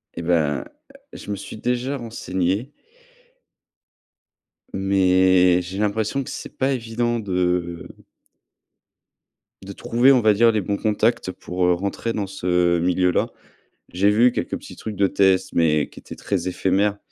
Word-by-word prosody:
Et -, -, -5 dB
ben, 80 Hz, -4 st, 0 dB, 0.5 s
je -, -, -10 dB
me -, -, -1 dB
suis 100 Hz, +2 st, -9 dB
déjà 125 Hz, +4 st, -2 dB
renseigné 110 Hz, 0 st, -3 dB, 2.0 s
mais 95 Hz, -2 st, +3 dB
j'ai 95 Hz, +3 st, -7 dB
l'impression 110 Hz, +6 st, -1 dB
que -, -, -9 dB
c'est -, -, -8 dB
pas 135 Hz, +1 st, +1 dB
évident 120 Hz, 0 st, -2 dB
de 90 Hz, -3 st, -2 dB, 1.7 s
de 100 Hz, +1 st, -9 dB
trouver, 120 Hz, +7 st, +3 dB
on 125 Hz, -, +3 dB
va 110 Hz, -1 st, +4 dB
dire 115 Hz, +3 st, +4 dB
les 105 Hz, -, 0 dB
bons 100 Hz, +2 st, -2 dB
contacts 110 Hz, -2 st, 0 dB
pour, 90 Hz, 0 st, -3 dB
heu, 90 Hz, -, +4 dB
rentrer 100 Hz, +5 st, -3 dB
dans 100 Hz, -3 st, -3 dB
ce 90 Hz, -2 st, +1 dB
milieu-là. 90 Hz, +1 st, +1 dB, 0.6 s
J'ai 100 Hz, +3 st, +2 dB
vu 120 Hz, +4 st, +4 dB
quelques 85 Hz, -, -3 dB
petits -, -, -12 dB
trucs 110 Hz, -2 st, -7 dB
de 100 Hz, 0 st, +3 dB
test, 95 Hz, -1 st, +2 dB
mais 75 Hz, -3 st, +2 dB
qui -, -, -14 dB
étaient -, -, -10 dB
très 95 Hz, -4 st, -3 dB
éphémères. 95 Hz, +3 st, 0 dB
95 Hz, 145 wpm, -22 LUFS, 90-110 Hz, 2.0 s, va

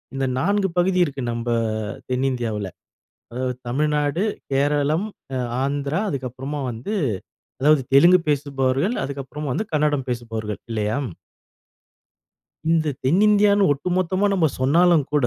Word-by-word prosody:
இந்த 135 Hz, -, 0 dB
4 200 Hz, +2 st, +1 dB
பகுதி 185 Hz, +1 st, +2 dB
இருக்கு 140 Hz, -2 st, -5 dB
நம்ம 115 Hz, +1 st, -4 dB, 0.6 s
தென்னிந்தியாவுல. 120 Hz, -6 st, -1 dB, 0.7 s
அதாவது 125 Hz, 0 st, -2 dB
தமிழ்நாடு, 150 Hz, +4 st, 0 dB, 0.3 s
கேரளம், 145 Hz, +6 st, +1 dB, 0.3 s
அ -, -, -1 dB, 0.3 s
ஆந்திரா 140 Hz, +4 st, -1 dB
அதுக்கப்புறமா 135 Hz, +2 st, -4 dB
வந்து, 120 Hz, -, -5 dB, 0.7 s
அதாவது 150 Hz, -1 st, +4 dB
தெலுங்கு 175 Hz, +6 st, +7 dB
பேசுபவர்கள், 140 Hz, -, 0 dB
அதுக்கப்புறமா 140 Hz, +2 st, -5 dB
வந்து 215 Hz, -, -2 dB
கன்னடம் 150 Hz, -3 st, +1 dB
பேசுபவர்கள் 110 Hz, -3 st, -4 dB
இல்லையா? 110 Hz, +2 st, -1 dB, 1.7 s
இந்த 160 Hz, -2 st, +2 dB, 0.2 s
தென்னிந்தியான்னு 205 Hz, +5 st, +4 dB
ஒட்டுமொத்தமா 185 Hz, +6 st, 0 dB
நம்ம 175 Hz, -5 st, +3 dB
சொன்னாலும் 165 Hz, +3 st, +4 dB
கூட, 145 Hz, -4 st, +3 dB
145 Hz, 105 wpm, -22 LUFS, 130-170 Hz, 1.7 s, தெலுங்கு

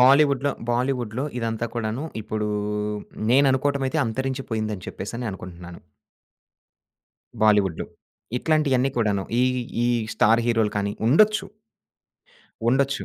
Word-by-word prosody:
బాలీవుడ్‌‌‌‌‌లో, 140 Hz, +1 st, +5 dB, 0.2 s
బాలీవుడ్‌‌‌‌‌లో 125 Hz, 0 st, -1 dB
ఇదంతా 115 Hz, 0 st, -2 dB
కూడాను 115 Hz, +4 st, -2 dB, 0.2 s
ఇప్పుడు, 105 Hz, 0 st, -2 dB, 0.8 s
నేననుకోవటం 135 Hz, +1 st, +3 dB
అయితే 155 Hz, +4 st, -1 dB
అంతరించి 130 Hz, +3 st, -2 dB
పోయిందని 110 Hz, -4 st, -2 dB
చెప్పేసనే 115 Hz, +5 st, -5 dB
అనుకుంటున్నాను. 90 Hz, -2 st, -9 dB, 1.6 s
బాలీవుడ్డు. 105 Hz, -5 st, +3 dB, 0.5 s
ఇట్లాంటియన్నీ 135 Hz, -4 st, +2 dB
కూడాను, 100 Hz, -4 st, +1 dB, 0.2 s
ఈ -, -, +4 dB, 0.4 s
ఈ -, -, +2 dB, 0.3 s
స్టార్ 115 Hz, +2 st, +4 dB
హీరోలు 115 Hz, -3 st, +2 dB
కానీ 100 Hz, 0 st, 0 dB
ఉండొచ్చు... 215 Hz, -, +4 dB, 1.2 s
ఉండొచ్చు. 135 Hz, +2 st, +1 dB
120 Hz, 95 wpm, -24 LUFS, 105-135 Hz, 1.6 s, బాలీవుడ్‌‌‌‌‌లో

